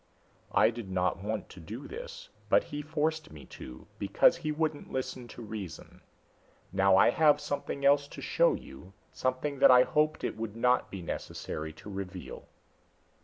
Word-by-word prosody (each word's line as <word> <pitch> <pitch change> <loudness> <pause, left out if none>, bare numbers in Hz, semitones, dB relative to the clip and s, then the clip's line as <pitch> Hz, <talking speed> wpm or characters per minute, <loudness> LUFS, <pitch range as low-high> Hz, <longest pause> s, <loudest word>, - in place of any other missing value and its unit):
"I - - +6
did 115 -4 -7
not 90 0 0
want 110 +1 -3
to - - -12
do 110 - -8
this, - - -8 0.2
but - - +5
he 145 0 -5
forced 155 +1 -1
me 75 -2 -11
to, 65 0 -10
because 100 +10 +4
he 155 -3 -2
wouldn't 155 -1 -2
listen 130 -1 -4
to 120 - -10
reason. 100 -7 -8 0.7
Now 95 0 +5
I 115 - +6
have 150 +1 +4
something 145 -1 -3
else 140 0 +5
to - - -10
show - - +3
you, 90 +8 -11 0.2
something 130 +2 -2
that - - +8
I 125 0 +8
hoped 155 +3 +1
it - - -2
would 110 -1 -5
not 125 +2 +2
be 95 -3 -7
necessary 80 -1 -5
to 90 - -11
reveal." 95 -2 -7
125 Hz, 170 wpm, -30 LUFS, 95-150 Hz, 0.7 s, that